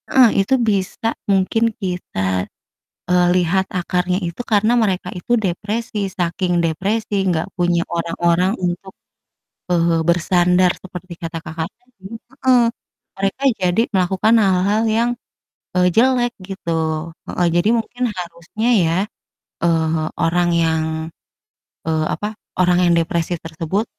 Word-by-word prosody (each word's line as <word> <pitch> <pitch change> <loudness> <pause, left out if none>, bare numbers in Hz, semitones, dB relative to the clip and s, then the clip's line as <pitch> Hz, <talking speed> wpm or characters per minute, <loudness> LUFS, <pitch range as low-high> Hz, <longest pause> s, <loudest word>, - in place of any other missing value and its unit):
Heeh, 255 -3 +6
itu 195 - 0 0.2
bisa 200 +2 -1 0.2
mungkin 195 +3 +2 0.2
kita, 180 - -4 0.9
eee, 180 0 +4
lihat 185 +1 +2
akarnya 180 +1 0
itu 170 +6 -7
karena 215 +2 +4
mereka 190 -4 0
itu 180 - -3
depresi, 215 +2 -2 0.2
saking 175 0 0
depresi, 200 +7 -1 0.2
gak 160 - -1
punya 175 -1 +2
orang-orang 170 +2 +1
untuk, 180 +2 -3 0.8
eee, 170 -1 +3
bersandar 180 +1 +3
seperti 185 -1 -8
kata 165 0 -4
Kakak 160 0 -4
tadi 245 -5 -33 0.2
heeh, 255 +1 +1 0.6
mereka 195 +6 -2 0.2
jadi 180 +4 +2
melakukan 190 +4 +2
hal-hal 195 +3 +2 0.2
yang, 235 +1 +2 0.7
eee, 180 0 +4
jelek 245 0 +3 0.2
gitu. 165 -3 -2 0.2
Heeh, 175 - 0
jadi 175 +4 +3
mungkin 245 +2 -3
harusnya 175 +6 -4 0.2
ya, 165 +1 +1 0.7
eee, 160 -1 +1 0.2
orang 175 +1 +2
yang 160 -1 +1 1.0
eee, 160 -1 +1
apa, 210 - -3 0.3
orang 180 -1 +4
yang 175 - +4
depresi 170 0 0
tersebut, 165 +6 -2
180 Hz, 120 wpm, -19 LUFS, 170-200 Hz, 1.0 s, Heeh